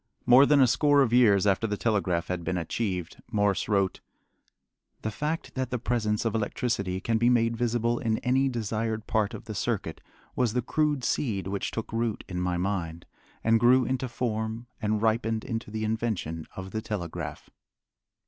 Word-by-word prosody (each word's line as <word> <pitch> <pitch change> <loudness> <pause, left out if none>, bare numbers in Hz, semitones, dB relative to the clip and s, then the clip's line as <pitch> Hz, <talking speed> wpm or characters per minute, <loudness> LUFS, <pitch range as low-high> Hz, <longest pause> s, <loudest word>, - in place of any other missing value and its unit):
More 130 +3 +7
than 145 -1 +5
a 135 - +7
score 145 +3 +4
of 120 -3 -1
years 105 -6 +5
after 100 +3 +2
the 105 -1 -2
telegraph 95 -7 0
had 90 -2 -3
been 90 - -1
achieved 90 0 -3
Morse 105 -3 +1
wrote: 100 -2 +1 1.0
The 110 - -1
fact 150 +8 -3
that 130 -1 -2
the 125 - -1
presence 110 -3 -1
of 115 - 0
electricity 105 -4 -1
can 110 +2 0
be 120 +1 +4
made 115 -1 +3
visible 120 0 0
in 110 -2 0
any 130 +2 +2
desired 110 -2 -2
part 110 -3 0
of - - -10
the 110 - -6
circuit 100 -6 -2 0.3
was 120 -4 +1
the 125 -1 0
crude 150 0 0
seed 110 -6 -1
which 100 +1 -2
took 115 -1 -5
root 115 -1 -1
in 90 -1 -3
my 90 -1 0
mind, 85 -3 -3 0.4
and 115 0 +4
grew 125 +2 +5
into 130 0 -1
form, 115 -1 -3 0.2
and 105 0 0
ripened 110 0 +1
into 115 -4 -4
the 110 +1 -4
invention 110 -8 -2
of 95 0 -7
the 110 - -3
telegraph. 85 -7 -5
110 Hz, 175 wpm, -27 LUFS, 100-120 Hz, 1.0 s, More